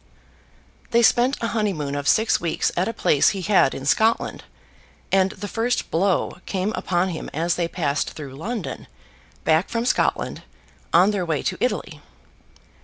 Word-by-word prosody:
They 235 0 +3
spent 245 +4 +4
a 230 - -1
honeymoon 190 -11 -1
of 145 -1 -3
six 220 +1 +3
weeks 170 -2 0
at 180 +2 +1
a - - -1
place 150 -9 +3
he 195 -2 -4
had 185 -8 +3
in 135 - -7
Scotland, 220 +10 +1 0.7
and 190 0 +3
the 205 - -7
first 230 +4 -1
blow 185 +1 0
came 195 +2 -1
upon 180 -2 0
him 165 - -5
as 165 +2 +1
they 170 0 -1
passed 150 -4 -2
through 140 -4 -8
London, 205 - -5 0.6
back 160 +3 +2
from 230 0 -2
Scotland, 250 - 0 0.5
on 185 +5 +5
their 200 -3 -1
way 160 -4 -1
to - - -2
Italy. 205 -10 -2
185 Hz, 160 wpm, -23 LUFS, 160-220 Hz, 0.7 s, on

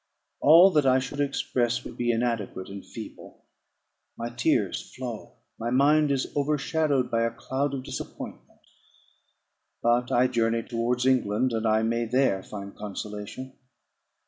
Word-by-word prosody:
All 170 +6 +8
that 150 -5 +3
I 130 0 +5
should 135 +2 -4
express 125 -4 0
would - - -9
be 120 0 +1
inadequate 115 -5 -2
and 100 0 -8
feeble. - - -11 0.7
My 115 +1 -4
tears 120 - 0
flow; 120 -4 -6 0.3
my 115 - -2
mind 145 +4 +4
is 135 -2 -1
overshadowed 145 -1 0
by 115 - +2
a 115 - +2
cloud 135 +4 -2
of 130 - -5
disappointment. - - -8 1.2
But 120 +1 +2
I 125 +1 +4
journey 115 -2 +1
towards 120 +2 -1
England, 125 -1 +2
and 110 0 0
I 110 0 +3
may 115 +1 0
there 125 -5 +2
find 100 0 -8
consolation. 105 +5 -7
120 Hz, 140 wpm, -26 LUFS, 115-135 Hz, 1.2 s, All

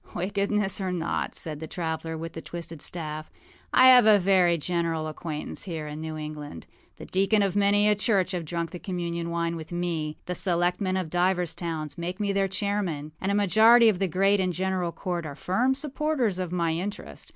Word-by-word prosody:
â 175 - -3
âWickedness 200 0 0
or 190 -1 -1
not,â 170 -2 -2
said 155 -2 -3
the 160 - -6
traveller 160 -1 -4
with 165 +1 -6
the 165 - -6
twisted 165 -3 -7
staff, 155 -2 -4 0.4
âI - - +4
have 255 -3 +8
a 215 -1 +8
very 180 -3 +3
general 165 -1 -1
acquaintance 155 0 -5
here 165 -5 -4
in 150 +1 -6
New 160 0 -5
England. 150 - -7 0.3
The - - -9
deacons 200 +2 +2
of 195 -1 -2
many 205 +1 +3
a 210 - +5
church 200 -2 +1
have 180 -3 -2
drunk 170 +1 -3
the 180 - -7
communion 170 -2 -3
wine 170 0 -1
with 160 0 -8
me; 170 -3 -2
the 180 - -3
selectmen 180 +2 +1
of 180 -4 -3
divers 180 -1 +1
towns 165 -1 -5
make 180 +3 -4
me 200 -1 0
their 195 0 +2
chairman; 190 -7 -2
and 195 - 0
a - - +1
majority 220 +4 +6
of 195 -5 0
the 195 - +1
Great 195 +4 +2
and 185 -1 0
General 185 -1 -1
Court 175 +1 -3
are 140 - -7
firm 240 - +1
supporters 275 -7 -1
of 180 -2 -3
my 170 -2 0
interest. 185 +5 -5
180 Hz, 200 wpm, -26 LUFS, 165-200 Hz, 0.4 s, have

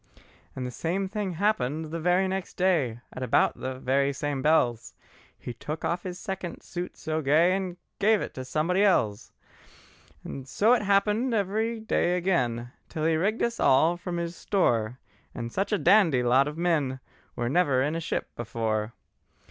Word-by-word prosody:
And 130 - -4
the 125 - -4
same 180 +9 -2
thing 200 -2 -3
happened 160 -5 0
the 165 - -3
very 180 +3 +2
next 190 0 -4
day, 150 -11 +1
At 130 - -7
about 125 -3 +2
the 130 0 -4
very 135 +2 +1
same 140 -1 -3
bells, 125 -6 +1 0.4
He 120 - -7
took 150 +7 -5
off 175 +1 -1
his 180 -1 -6
second 190 -3 -5
suit 175 0 -6
so 155 0 -2
gay, 160 +6 +4
And 185 -2 -4 0.2
gave 215 +1 +4
it - - -5
to 130 - -6
somebody 160 +8 0
else. 110 - +1 1.1
So 215 - +3
it 250 - +3
happened 210 +4 +2
every 220 +3 0
day 180 -5 +1
again, 125 -10 0 0.2
Till 155 -1 -3
he'd 160 -1 +3
rigged 205 +7 0
us 235 0 -1
all 160 +6 +4
from 175 0 -5
his 170 0 -3
store; 120 - 0 0.4
And 115 0 -5
such 195 - -1
a 210 - +3
dandy 170 -13 +4
lot 130 +3 +4
of 150 +1 -5
men 155 -7 0 0.4
Were 120 - -2
never 140 -3 +2
in 150 +2 -1
a - - -1
ship - - -2
before. 115 -1 -2
165 Hz, 170 wpm, -27 LUFS, 130-190 Hz, 1.1 s, gay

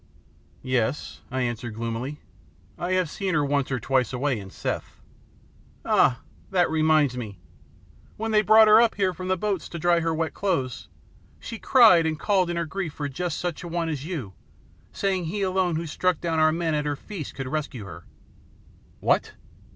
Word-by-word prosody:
"Yes," 130 +1 -1
I 130 +1 -2
answered 120 -2 -3
gloomily. 115 +5 -4 0.5
"I 180 +1 -2
have 185 -2 +2
seen 185 +3 -2
her 150 -1 +2
once 140 -1 0
or 130 -2 -1
twice 125 +1 +1
away 130 -1 -1
in 95 -1 -9
Seth." - - -5 0.9
"Ah, 125 - +3 0.3
that 180 -4 +2
reminds 155 -4 +3
me! 110 -6 -6 0.8
When 225 +1 -2
they 210 -1 +5
brought 215 +1 +7
her 215 +2 +8
up 235 -1 +2
here 190 -2 +1
from 185 +2 -6
the 185 0 +1
boats 195 -3 -2
to 170 - -6
dry 170 +1 +3
her 165 0 0
wet 160 -1 -1
clothes, 150 - -2 0.5
she 230 - -7
cried 215 -11 +6
and 155 -1 -1
called 190 -2 +2
in 175 - -2
her 170 - -1
grief 170 -1 -4
for 145 -2 -4
just 165 +4 -3
such 175 -3 -3
a 175 - -7
one 170 -1 -2
as 145 -4 -3
you, 150 - -5 0.6
saying 190 -3 -1
he 200 +5 -2
alone 185 -2 +1
who 165 +2 -2
struck 180 +2 0
down 165 -2 -1
our 155 0 +5
men 165 0 -1
at 150 0 0
her 145 - -1
feast 170 -1 -8
could 135 -1 -5
rescue 135 -6 -4
her 85 -2 -11 0.5
" - - -29
"What! - - +1
160 Hz, 190 wpm, -25 LUFS, 135-185 Hz, 0.9 s, her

